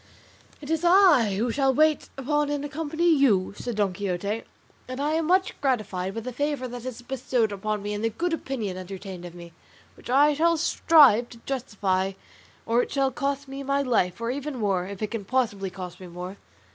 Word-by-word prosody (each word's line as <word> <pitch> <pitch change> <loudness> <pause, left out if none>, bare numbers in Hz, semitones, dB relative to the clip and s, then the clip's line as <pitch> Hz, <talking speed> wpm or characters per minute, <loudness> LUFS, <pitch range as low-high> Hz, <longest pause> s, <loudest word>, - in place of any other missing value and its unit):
"It 295 +1 -6
is 320 +1 0
I 345 - +5
who 230 +4 0
shall 270 +1 +2
wait 310 +1 +3
upon 295 +2 0
and 290 0 -2
accompany 315 +3 -2
you," 265 - +3
said 240 +1 -5
Don 200 -3 +1
Quixote; 200 +3 -3 0.4
"and 255 +1 -6
I 290 +2 0
am 320 0 0
much 375 +2 +3
gratified 205 -8 -1
by 225 - -3
the 255 +2 -6
favour 285 0 -1
that 245 0 -8
is 250 -1 -6
bestowed 245 -3 0
upon 210 +1 -3
me, 205 0 -3
and 210 +1 -4
the 225 - +2
good 335 +10 -2
opinion 230 - -3
entertained 185 -1 -8
of 175 0 -9
me, 170 -1 -11 0.4
which - - -13
I 285 +4 +5
shall 335 +3 +2
strive 285 -8 +5
to 235 - -12
justify 195 -7 -1 0.5
or 235 +2 +3
it - - -4
shall 270 -1 +1
cost 280 +1 -2
me 270 +1 -6
my 275 +1 0
life, 220 -9 +1
or 230 +1 -1
even 280 +1 -4
more, 195 -5 0
if 200 +1 -6
it 210 - -3
can 225 -3 -3
possibly 205 -4 -1
cost 180 -1 -8
me 185 - -9
more." 180 +3 -7
245 Hz, 200 wpm, -26 LUFS, 200-285 Hz, 0.5 s, I